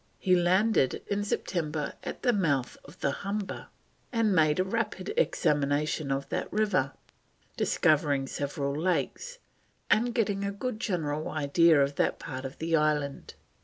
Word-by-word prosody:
He 185 Hz, -2 st, +3 dB
landed 180 Hz, -, +2 dB
in 205 Hz, 0 st, 0 dB
September 155 Hz, -7 st, -2 dB
at -, -, -6 dB
the 245 Hz, -2 st, +3 dB
mouth 145 Hz, -, 0 dB
of 150 Hz, +5 st, -15 dB
the -, -, +1 dB
Humber, 200 Hz, -1 st, -4 dB, 0.4 s
and 225 Hz, -4 st, +2 dB
made 155 Hz, -2 st, +3 dB
a -, -, +4 dB
rapid 230 Hz, -, -2 dB
examination 145 Hz, -, +1 dB
of 135 Hz, +1 st, -1 dB
that -, -, -3 dB
river, 200 Hz, -11 st, +1 dB, 0.6 s
discovering 145 Hz, -3 st, +2 dB
several 140 Hz, 0 st, -3 dB
lakes, 185 Hz, -, -1 dB, 0.5 s
and 235 Hz, +2 st, +3 dB
getting 205 Hz, -4 st, 0 dB
a 200 Hz, -, -1 dB
good 215 Hz, +2 st, -4 dB
general 155 Hz, -9 st, -2 dB
idea 155 Hz, +1 st, +4 dB
of 140 Hz, 0 st, +1 dB
that -, -, +1 dB
part 130 Hz, -2 st, -6 dB
of 135 Hz, -, -7 dB
the 165 Hz, +1 st, 0 dB
island. 150 Hz, -2 st, 0 dB
165 Hz, 145 wpm, -28 LUFS, 145-205 Hz, 0.6 s, a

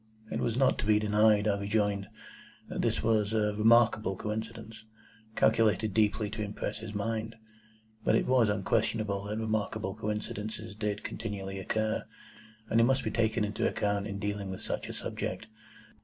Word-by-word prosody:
It -, -, -1 dB
was 115 Hz, 0 st, 0 dB
not 135 Hz, 0 st, +3 dB
to 105 Hz, -, -2 dB
be 105 Hz, -1 st, +5 dB
denied, 105 Hz, 0 st, +4 dB
I 100 Hz, -1 st, +1 dB
rejoined, 100 Hz, -1 st, 0 dB, 0.6 s
that -, -, -2 dB
this -, -, 0 dB
was 110 Hz, -1 st, +2 dB
a 105 Hz, -1 st, +2 dB
remarkable 110 Hz, -2 st, +4 dB
coincidence, 110 Hz, +1 st, -5 dB, 0.5 s
calculated 110 Hz, -2 st, +3 dB
deeply 105 Hz, 0 st, +2 dB
to 110 Hz, 0 st, -4 dB
impress 105 Hz, 0 st, -4 dB
his 110 Hz, -1 st, -7 dB
mind. 110 Hz, +2 st, -2 dB, 0.7 s
But -, -, +3 dB
it -, -, +2 dB
was 125 Hz, -4 st, +4 dB
unquestionable 105 Hz, -1 st, 0 dB
that 105 Hz, +1 st, -3 dB
remarkable 110 Hz, -2 st, -1 dB
coincidences 105 Hz, +1 st, -4 dB
did 105 Hz, 0 st, -3 dB
continually 100 Hz, -3 st, -5 dB
occur, 110 Hz, +3 st, -1 dB, 0.6 s
and 115 Hz, -, +2 dB
they -, -, +6 dB
must 135 Hz, +2 st, +3 dB
be 110 Hz, -, -2 dB
taken 110 Hz, -1 st, +1 dB
into 105 Hz, +1 st, 0 dB
account 100 Hz, 0 st, -1 dB
in 100 Hz, -1 st, -4 dB
dealing 105 Hz, -1 st, -3 dB
with 95 Hz, -, -5 dB
such -, -, -3 dB
a -, -, -5 dB
subject. -, -, -4 dB
105 Hz, 160 wpm, -30 LUFS, 105-110 Hz, 0.7 s, they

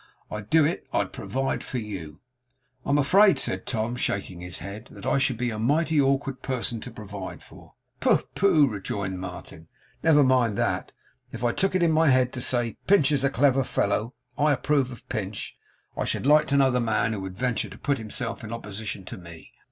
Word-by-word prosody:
'I'd 105 Hz, 0 st, -6 dB
do 160 Hz, -2 st, +5 dB
it. 160 Hz, -, -2 dB
I'd -, -, -1 dB
provide 135 Hz, +2 st, -2 dB
for 130 Hz, -, -4 dB
you.' 95 Hz, -8 st, -6 dB, 0.7 s
'I -, -, -3 dB
am 140 Hz, -, +4 dB
afraid,' 195 Hz, +8 st, +5 dB
said -, -, -2 dB
Tom, 115 Hz, 0 st, -1 dB
shaking 95 Hz, -6 st, -2 dB
his 90 Hz, 0 st, -6 dB
head, 105 Hz, +5 st, -8 dB
'that -, -, -11 dB
I -, -, +2 dB
should 130 Hz, -3 st, +1 dB
be 120 Hz, 0 st, -1 dB
a 110 Hz, -, -5 dB
mighty 150 Hz, +5 st, +2 dB
awkward 135 Hz, -1 st, 0 dB
person 125 Hz, -3 st, -2 dB
to -, -, -7 dB
provide 100 Hz, -4 st, -8 dB
for.' -, -, -16 dB, 0.2 s
'Pooh, -, -, +3 dB
pooh!' 165 Hz, -7 st, +4 dB
rejoined 100 Hz, -4 st, -4 dB
Martin. 90 Hz, -3 st, -9 dB, 0.3 s
'Never 150 Hz, -3 st, +5 dB
mind 125 Hz, -5 st, +3 dB
that. -, -, -1 dB, 0.4 s
If 115 Hz, -, -7 dB
I 120 Hz, -, +3 dB
took 195 Hz, +8 st, 0 dB
it 185 Hz, -, +3 dB
in 165 Hz, -, +4 dB
my 160 Hz, -1 st, +4 dB
head 130 Hz, -1 st, +3 dB
to 125 Hz, -, -4 dB
say, 120 Hz, -2 st, +1 dB
"Pinch 155 Hz, -7 st, +5 dB
is 140 Hz, -2 st, +1 dB
a 140 Hz, -, +3 dB
clever 135 Hz, 0 st, +3 dB
fellow; 105 Hz, +1 st, -1 dB, 0.2 s
I 150 Hz, 0 st, +4 dB
approve 135 Hz, 0 st, +1 dB
of 120 Hz, -, -12 dB
Pinch;" 100 Hz, -1 st, -4 dB, 0.4 s
I -, -, -1 dB
should -, -, -1 dB
like 150 Hz, +2 st, +5 dB
to 140 Hz, -, +2 dB
know 135 Hz, -1 st, +4 dB
the 125 Hz, 0 st, +1 dB
man 110 Hz, -1 st, +1 dB
who 100 Hz, -, -4 dB
would 95 Hz, -1 st, -7 dB
venture 125 Hz, -1 st, -1 dB
to -, -, -11 dB
put 140 Hz, -3 st, -1 dB
himself 115 Hz, +2 st, -4 dB
in 110 Hz, -, -7 dB
opposition 105 Hz, -3 st, -6 dB
to -, -, -8 dB
me. 85 Hz, -2 st, -12 dB
125 Hz, 205 wpm, -26 LUFS, 105-140 Hz, 0.7 s, do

